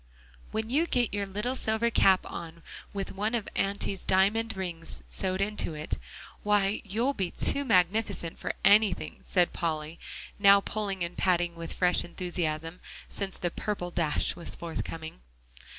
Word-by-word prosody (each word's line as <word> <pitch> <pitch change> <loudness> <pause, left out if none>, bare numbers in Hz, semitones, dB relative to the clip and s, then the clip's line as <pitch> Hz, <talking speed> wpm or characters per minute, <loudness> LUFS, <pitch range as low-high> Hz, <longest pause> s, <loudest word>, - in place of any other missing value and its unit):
"When 220 0 -2
you 315 +6 +3
get 245 -8 +1
your 200 -1 -1
little 210 +6 -2
silver 230 -2 +1
cap 190 -4 +4
on 170 0 -8 0.3
with 195 -1 -4
one 210 +4 -1
of 225 - -2
Auntie's 195 -1 -1
diamond 205 +3 +2
rings 170 -3 -4
sewed 190 0 +1
in 210 +1 -1 0.2
it, 150 +1 -3 0.4
why, 205 0 +2
you'll 230 +7 0
be 190 -8 -1
too 280 - +2
magnificent 190 -5 +1
for - - -2
anything," 205 0 +4
said 180 -2 +2
Polly, 160 -1 -3 0.4
now 200 -1 +8
pulling 200 -2 -2
and 170 +1 -4
patting 175 -2 +2
with 165 -1 -6
fresh 180 -1 +4
enthusiasm, 170 -2 -3 0.3
since 195 -2 -3
the 175 - -2
"purple 180 -3 -3
dash" 160 -4 +1
was 170 -1 -4
forthcoming. 165 - -5
190 Hz, 150 wpm, -29 LUFS, 170-210 Hz, 0.4 s, now